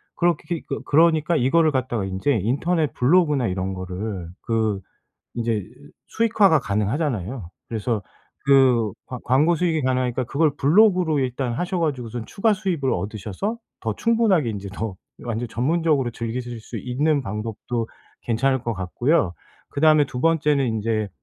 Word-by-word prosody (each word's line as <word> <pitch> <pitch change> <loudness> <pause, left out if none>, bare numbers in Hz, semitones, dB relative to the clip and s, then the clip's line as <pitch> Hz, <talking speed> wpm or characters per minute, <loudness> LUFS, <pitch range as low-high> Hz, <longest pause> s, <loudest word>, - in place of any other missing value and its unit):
그렇게 170 -1 0
그 - - -3
그러니까 160 +1 +3
이거를 155 +5 +3
갖다가 130 -5 -1
인제 95 +9 0
인터넷 155 - 0
블로그나 150 -2 +3
이런 95 0 -2
거를 95 0 -5
그 110 -3 0 0.6
이제 110 -4 -1 0.4
수익화가 210 -8 +3
가능하잖아요. 105 - -2 0.2
그래서 110 -1 -2 0.4
그 130 -6 +4
광 125 - -6
광고 145 +7 +3
수익이 160 -2 0
가능하니까 130 -1 0
그걸 150 +5 +2
블로그로 180 0 +4
일단 130 -1 -1
하셔 180 +9 -2
가지고선 125 -7 -3
추가 220 +2 +1
수입을 185 -10 -1
얻으셔서 105 - -3 0.2
더 110 -2 -2
충분하게 220 - +2
인제 100 -2 -6
더 110 -1 -4 0.3
완전 120 0 -3
전문적으로 145 +2 +1
즐기실 120 +1 -5
수 - - -7
있는 145 +4 0
방법도 110 +2 -4 0.3
괜찮을 130 +3 +1
것 120 - -2
같고요. 110 - 0 0.4
그다음에 155 0 +4
2 125 - -6
번째는 150 -3 +2
인제 110 -1 -1
130 Hz, 335 characters per minute, -23 LUFS, 110-160 Hz, 0.6 s, 그